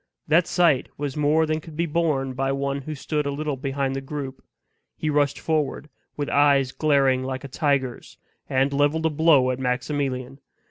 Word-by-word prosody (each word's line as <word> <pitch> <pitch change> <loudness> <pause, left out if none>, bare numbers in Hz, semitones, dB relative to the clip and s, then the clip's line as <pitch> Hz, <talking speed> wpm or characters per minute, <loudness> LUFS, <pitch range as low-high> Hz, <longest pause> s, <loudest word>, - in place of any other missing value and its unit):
That 160 +3 +4
sight 170 -7 +2
was 145 -2 -3
more 150 +2 +3
than 155 0 -1
could 155 -1 -12
be 170 - +1
borne 150 -5 0
by 135 +1 -1
one 140 0 -2
who 155 +3 -6
stood 150 +1 -2
a - - -1
little 150 0 -2
behind 135 0 -2
the 135 - -3
group. 135 -1 -6 0.5
He 155 - -1
rushed 145 -1 +1
forward, 150 -1 -1 0.3
with 145 -1 -2
eyes 140 -2 +3
glaring 135 -4 +2
like 130 0 -4
a - - -6
tiger's, 135 -2 -1 0.3
and 135 +2 +1
leveled 145 +3 +1
a 160 - +2
blow 145 -4 +4
at 130 - -4
Maximilian. 130 +1 -2
140 Hz, 180 wpm, -24 LUFS, 135-150 Hz, 0.5 s, That